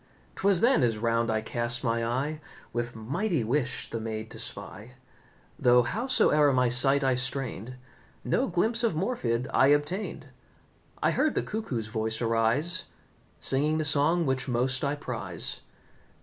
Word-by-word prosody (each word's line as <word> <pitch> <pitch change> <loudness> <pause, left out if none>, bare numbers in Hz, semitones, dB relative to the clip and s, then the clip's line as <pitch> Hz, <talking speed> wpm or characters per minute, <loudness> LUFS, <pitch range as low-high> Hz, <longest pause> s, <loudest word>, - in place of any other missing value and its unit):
'Twas 195 -3 +4
then 245 - +4
as 115 -3 +1
round 115 +1 0
I 110 -1 0
cast 120 +2 -1
my 115 -1 0
eye 135 +7 -2 0.3
With 120 0 -3
mighty 145 - -2
wish 130 +3 -1
the 115 - -5
maid 110 0 -5
to - - -6
spy; 115 +5 -6 0.7
Though, 125 0 +5
howsoe'er 150 - +2
my 125 -1 +2
sight 135 +3 +4
I 135 -1 +3
strained, 125 -2 -3 0.5
No 265 - 0
glimpse 220 +6 0
of 225 -8 +1
Morfydd 130 - -1
I 135 - +5
obtained. 145 +8 -1 0.7
I - - +3
heard 310 - +1
the - - 0
cuckoo's 175 - -4
voice 110 0 -2
arise, 120 +10 +1 0.5
Singing 150 +4 +1
the 155 - 0
song 155 +4 +3
which 130 -1 -1
most 125 +1 0
I 140 +1 0
prize. 115 -11 -3
130 Hz, 150 wpm, -27 LUFS, 115-155 Hz, 0.7 s, Though